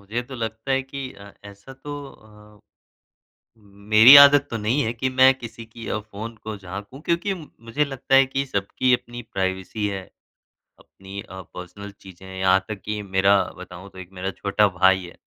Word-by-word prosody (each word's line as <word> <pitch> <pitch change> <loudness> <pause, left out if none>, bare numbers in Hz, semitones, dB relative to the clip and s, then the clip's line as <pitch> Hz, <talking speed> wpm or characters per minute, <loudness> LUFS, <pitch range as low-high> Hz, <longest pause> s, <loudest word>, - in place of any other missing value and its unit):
मुझे 110 +5 -4
तो 130 +2 -11
लगता 115 +2 -5
है 135 0 +1
कि 135 0 -7
अ, 100 0 -14
ऐसा 100 +5 -12
तो 135 +2 -11 0.7
अ, - - -29 1.0
मेरी 105 +6 +6
आदत 140 0 +8
तो 115 - -2
नहीं 115 +7 0
है 110 - -1
कि 130 +3 -2
मैं 130 +1 +5
किसी 115 -1 -10
की 115 0 -11
अ, 110 - -2
फ़ोन 110 +2 -9
को 110 -1 -5
झाँकू, 100 +7 -9
क्योंकि 175 +5 -1
मुझे 150 -5 -4
लगता 135 -1 -1
है 135 - +6
कि 135 +1 -3
सबकी 125 +2 0
अपनी 120 0 -3
प्राइवेसी 95 +2 -2
है, 95 -2 -4 0.8
अपनी 95 +1 -11
अ, 95 +1 -10
पर्सनल 100 +3 -9
चीज़ें 95 -1 -14
हैं 95 0 -9
यहाँ 95 0 +3
तक 105 -3 -6
कि 105 0 -3
मेरा 100 +1 +4 0.2
बताऊँ 95 +4 -11
तो 95 - -18
1 90 0 -10
मेरा 95 +1 -4
छोटा 105 +1 +2
भाई 95 +1 +4
है 85 - -13
110 Hz, 185 wpm, -23 LUFS, 100-130 Hz, 1.0 s, आदत